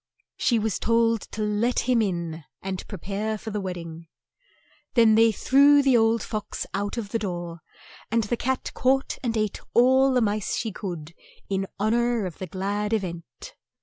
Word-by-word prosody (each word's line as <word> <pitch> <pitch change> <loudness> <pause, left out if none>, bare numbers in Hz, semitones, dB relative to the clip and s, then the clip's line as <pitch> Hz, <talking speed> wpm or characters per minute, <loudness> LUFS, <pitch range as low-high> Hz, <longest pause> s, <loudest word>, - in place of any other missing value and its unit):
She 235 - +2
was 220 -1 -1
told 230 -1 +2
to 215 - -4
let 210 +4 +1
him 245 -2 +2
in 170 -5 -3 0.2
and 190 -1 -4
pre 200 - -6
pare 205 +4 -3
for 220 +1 -7
the 210 0 -2
wed 185 -2 -4
ding. 165 -1 -9 0.9
Then 230 -2 +6
they 225 +1 +5
threw 280 +6 +5
the 270 -2 +4
old 225 0 +3
fox 215 -2 -4
out 205 +3 -2
of 215 -4 -4
the 230 - -1
door, 175 -4 -5 0.5
and 230 +1 +2
the 210 +4 -1
cat 260 +2 -2
caught 265 +1 +1
and 230 -3 -1
ate 215 -2 -1 0.2
all 260 +3 +5
the 255 - +3
mice 210 -2 0
she 225 - -2
could 170 -6 -6 0.4
in 195 0 -1
hon 215 +2 +2
or 235 -2 +1
of 175 -4 -7
the 185 - -5
glad 200 +4 -2
e - - +5
vent. 180 - -8
215 Hz, 185 wpm, -25 LUFS, 190-235 Hz, 0.9 s, Then